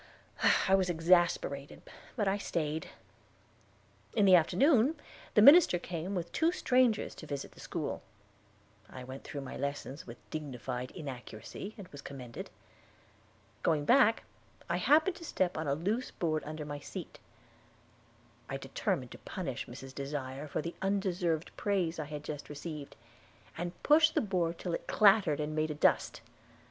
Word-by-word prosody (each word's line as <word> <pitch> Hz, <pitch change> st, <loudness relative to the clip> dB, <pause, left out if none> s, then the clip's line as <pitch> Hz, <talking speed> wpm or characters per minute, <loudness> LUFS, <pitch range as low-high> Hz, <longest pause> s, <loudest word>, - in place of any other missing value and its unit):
I 190 Hz, -, +3 dB
was 190 Hz, -2 st, +3 dB
exasperated, 165 Hz, -4 st, +1 dB, 0.3 s
but 210 Hz, -5 st, 0 dB
I 195 Hz, +1 st, +1 dB
stayed. 160 Hz, -4 st, -2 dB, 1.3 s
In 210 Hz, -3 st, +4 dB
the 190 Hz, -, +7 dB
afternoon 255 Hz, -, +5 dB, 0.4 s
the 210 Hz, -, +7 dB
minister 290 Hz, -, +8 dB
came 175 Hz, +2 st, -4 dB
with 170 Hz, -1 st, -3 dB
two 330 Hz, +1 st, +2 dB
strangers 250 Hz, -, +2 dB
to 155 Hz, -, -11 dB
visit 140 Hz, -1 st, -5 dB
the -, -, -18 dB
school. -, -, -4 dB, 0.9 s
I 130 Hz, -, -9 dB
went 130 Hz, +2 st, -8 dB
through 140 Hz, -, -6 dB
my 135 Hz, -, -7 dB
lessons 140 Hz, -1 st, -4 dB
with 120 Hz, 0 st, -9 dB
dignified 130 Hz, -4 st, -4 dB
inaccuracy, 135 Hz, -, -7 dB
and 200 Hz, -4 st, -9 dB
was 145 Hz, -, -10 dB
commended. 125 Hz, -4 st, -8 dB, 1.1 s
Going 150 Hz, -3 st, +1 dB
back, 240 Hz, -, +5 dB, 0.4 s
I -, -, 0 dB
happened 320 Hz, +5 st, +4 dB
to 340 Hz, -, -11 dB
step 185 Hz, -, 0 dB
on 155 Hz, -1 st, -3 dB
a 140 Hz, -, +2 dB
loose 210 Hz, -, -1 dB
board 155 Hz, -3 st, -1 dB
under 155 Hz, 0 st, -5 dB
my 145 Hz, -1 st, -5 dB
seat. -, -, -8 dB, 1.3 s
I -, -, -2 dB
determined -, -, -2 dB
to -, -, -10 dB
punish -, -, -5 dB
Mrs. 135 Hz, 0 st, -9 dB
Desire 140 Hz, 0 st, -5 dB
for 150 Hz, -, -3 dB
the 170 Hz, -, -4 dB
undeserved 185 Hz, -4 st, 0 dB
praise 180 Hz, -5 st, 0 dB
I 155 Hz, -, -2 dB
had 150 Hz, 0 st, -7 dB
just 150 Hz, -1 st, -6 dB
received, 150 Hz, 0 st, -7 dB, 0.6 s
and 175 Hz, +1 st, -3 dB
pushed 310 Hz, +1 st, +5 dB
the -, -, +4 dB
board 175 Hz, -5 st, -1 dB
till 175 Hz, -, -4 dB
it -, -, -4 dB
clattered 195 Hz, -8 st, +5 dB
and 150 Hz, 0 st, -2 dB
made 155 Hz, 0 st, +1 dB
a 150 Hz, -, -3 dB
dust. -, -, +2 dB
165 Hz, 155 wpm, -32 LUFS, 145-200 Hz, 1.3 s, minister